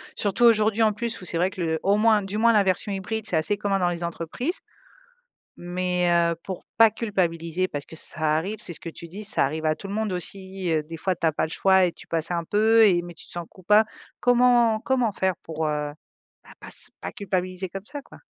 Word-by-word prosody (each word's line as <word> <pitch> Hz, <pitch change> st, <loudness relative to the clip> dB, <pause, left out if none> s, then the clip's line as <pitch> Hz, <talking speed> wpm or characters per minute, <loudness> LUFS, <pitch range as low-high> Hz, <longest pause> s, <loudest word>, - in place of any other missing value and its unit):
Surtout, 205 Hz, +3 st, 0 dB
aujourd'hui, 220 Hz, -1 st, +4 dB
en 215 Hz, -1 st, +3 dB
plus 230 Hz, +1 st, -3 dB
où -, -, -8 dB
c'est 170 Hz, -, -1 dB
vrai 180 Hz, +2 st, +2 dB
que 185 Hz, -, -8 dB
le 160 Hz, -1 st, 0 dB
au 200 Hz, +2 st, +3 dB
moins 215 Hz, -1 st, +4 dB
du 195 Hz, +2 st, -4 dB
moins 230 Hz, +1 st, +4 dB
la 210 Hz, -2 st, +5 dB
version 190 Hz, +2 st, 0 dB
hybride, 210 Hz, +3 st, -3 dB
c'est 180 Hz, -, +2 dB
assez 160 Hz, +6 st, +2 dB
commun 200 Hz, -1 st, 0 dB
dans 180 Hz, -1 st, +2 dB
les 170 Hz, -1 st, -4 dB
entreprises, 170 Hz, -, -4 dB, 1.0 s
mais 180 Hz, 0 st, -1 dB
heu, 170 Hz, -1 st, +2 dB
pour 190 Hz, -2 st, -6 dB
pas 225 Hz, -1 st, +7 dB
culpabiliser 185 Hz, -5 st, -1 dB
parce 145 Hz, -5 st, -6 dB
que 160 Hz, -, -11 dB
ça 155 Hz, -1 st, 0 dB
arrive, 195 Hz, +7 st, -2 dB
c'est 175 Hz, -, -3 dB
ce -, -, -7 dB
que -, -, -7 dB
tu 170 Hz, -, -10 dB
dis, 200 Hz, +6 st, -8 dB
ça 210 Hz, -, +2 dB
arrive 155 Hz, +3 st, -3 dB
à 155 Hz, -, +2 dB
tout 195 Hz, -, -9 dB
le 200 Hz, -, -4 dB
monde 215 Hz, -3 st, -1 dB
aussi, 190 Hz, 0 st, -4 dB
heu, 155 Hz, -1 st, +1 dB
des 165 Hz, +2 st, -9 dB
fois, 185 Hz, +2 st, -1 dB
tu 165 Hz, -, -1 dB
as 160 Hz, -, +3 dB
pas -, -, 0 dB
le -, -, -12 dB
choix 190 Hz, +2 st, +4 dB
et 175 Hz, -, -2 dB
tu -, -, -15 dB
passais 165 Hz, +1 st, -2 dB
un 170 Hz, -1 st, -2 dB
peu 220 Hz, +3 st, +4 dB
et 175 Hz, -3 st, +3 dB
mais 175 Hz, 0 st, -9 dB
tu -, -, -10 dB
te -, -, -11 dB
sens 175 Hz, -1 st, -5 dB
coupa 210 Hz, +4 st, +3 dB, 0.4 s
comment 245 Hz, -2 st, +4 dB
comment 250 Hz, -4 st, +1 dB
faire 190 Hz, -1 st, 0 dB
pour, 160 Hz, -1 st, -3 dB
heu, 150 Hz, -1 st, -2 dB, 0.5 s
bah -, -, -17 dB
pas -, -, -11 dB
s -, -, +2 dB
pas -, -, -5 dB
culpabiliser 185 Hz, -1 st, -3 dB
comme 195 Hz, +3 st, -8 dB
ça, 290 Hz, 0 st, -7 dB
quoi? -, -, -16 dB
190 Hz, 245 wpm, -24 LUFS, 170-215 Hz, 1.0 s, pas